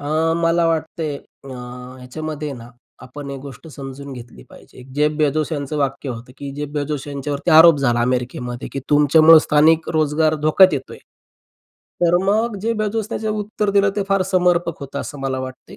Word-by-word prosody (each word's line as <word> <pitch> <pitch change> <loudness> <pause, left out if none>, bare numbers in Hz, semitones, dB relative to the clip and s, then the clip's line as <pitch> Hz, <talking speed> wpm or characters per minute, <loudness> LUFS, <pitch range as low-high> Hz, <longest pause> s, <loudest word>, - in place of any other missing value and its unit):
अ, 145 - -7 0.4
मला 165 0 +2
वाटतंय 160 -2 -2 0.3
अ, - - -11 0.5
ह्याच्यामध्ये 150 +3 -6
ना, 120 -3 -10 0.4
आपण 140 +2 -9
एक 140 - -6
गोष्ट 140 +2 -11
समजून 140 -1 -9
घेतली 120 - -11
पाहिजे. - - -15
जेफ 150 +1 +2
बेजोस 155 +1 +1
यांचं 145 0 -3
वाक्य 140 0 -2
होतं 120 0 -7
की 140 -1 -6
जेफ 145 0 -4
बेजोस 145 -1 -3
यांच्यावरती 145 +3 -3
आरोप 160 0 +8
झाला 120 -4 +1
अमेरिकेमध्ये, 125 0 -2
की 135 - -4
"तुमच्यामुळं 155 +2 +7
स्थानिक 155 +2 +3
रोजगार 155 0 +2
धोक्यात 185 +4 +6
येतोय." 135 -2 -5 1.0
तर 175 0 +4
मग 215 +3 +1
जे 230 - 0
बाजूने 215 +1 -2
जे 220 - -3
उत्तर 210 0 -2
दिलं 200 0 +3
ते 205 - +1
फार 195 -1 +2
समर्पक 175 -2 +1
होतं 140 0 -5
असं 145 - -8
मला 135 -1 -2
वाटतंय. 130 0 -9
150 Hz, 170 wpm, -20 LUFS, 135-165 Hz, 1.0 s, आरोप